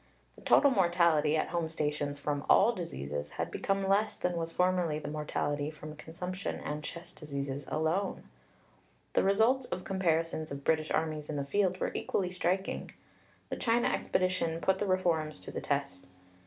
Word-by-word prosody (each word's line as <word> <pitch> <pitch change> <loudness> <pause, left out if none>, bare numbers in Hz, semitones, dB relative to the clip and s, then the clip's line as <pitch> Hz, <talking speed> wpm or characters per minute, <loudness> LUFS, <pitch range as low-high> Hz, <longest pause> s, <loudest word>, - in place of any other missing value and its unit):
The - - -17
total 280 - +5
mortality 170 - +3
at - - 0
home 170 -2 -1
stations 150 -2 -2
from 145 0 -2
all 225 +5 +6
diseases 75 - -5
had - - -3
become 195 0 0
less 205 +2 +2
than 180 -1 -1
was 165 -1 -2
formerly 180 -3 +2
the 155 - -6
mortality 145 -1 -2
from 155 0 -9
consumption 180 +5 -5
and 150 0 -4
chest 170 +2 -8
diseases 140 -1 -4
alone. 165 +5 0 0.9
The - - +4
results 225 +7 +3
of 185 - -4
comparisons 165 -4 0
of 140 0 -6
British 155 0 +1
armies 155 -2 -1
in 155 - -2
the 140 -1 -2
field 185 +3 +1
were - - -1
equally 180 -2 -1
striking. 185 +1 -1 0.6
The - - -3
China 235 +1 +2
expedition 185 -3 0
put 190 +2 +2
the 205 - 0
reforms 165 -5 +1
to - - -7
the - - -4
test. 140 -11 -2
165 Hz, 165 wpm, -31 LUFS, 150-185 Hz, 0.9 s, all